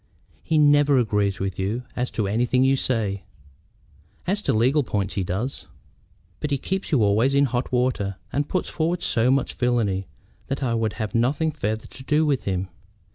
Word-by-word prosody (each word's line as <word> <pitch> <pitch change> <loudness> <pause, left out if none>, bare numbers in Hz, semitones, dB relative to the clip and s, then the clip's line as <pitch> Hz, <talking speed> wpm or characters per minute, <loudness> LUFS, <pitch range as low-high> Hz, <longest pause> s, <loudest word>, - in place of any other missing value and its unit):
He 160 - 0
never 145 -1 +5
agrees 105 -4 +1
with 95 -2 -3
you 105 +6 -1
as 125 0 -1
to 105 -3 +1
anything 120 +5 +2
you 135 +1 +4
say." 110 -7 -1 1.0
"As 200 +3 0
to - - 0
legal 130 +7 +3
points 100 -6 -2
he 95 - -1
does." 100 +9 -4 0.7
"But 150 - -2
he 140 - +1
keeps 190 +8 -3
you 135 -8 +4
always 110 +7 +3
in 140 0 +5
hot 125 -1 -2
water, 125 -6 0 0.2
and 145 +1 -1
puts 185 - -1
forward 170 +2 -1
so 115 +1 +2
much 135 0 +1
villany 110 -6 0 0.4
that 135 +1 -3
I 120 -3 0
would 110 -2 0
have 110 0 -4
nothing 140 +7 +1
farther 110 -7 -3
to 130 - -12
do 150 +3 +2
with 140 -4 0
him. 95 -1 -2
125 Hz, 185 wpm, -24 LUFS, 105-140 Hz, 1.0 s, never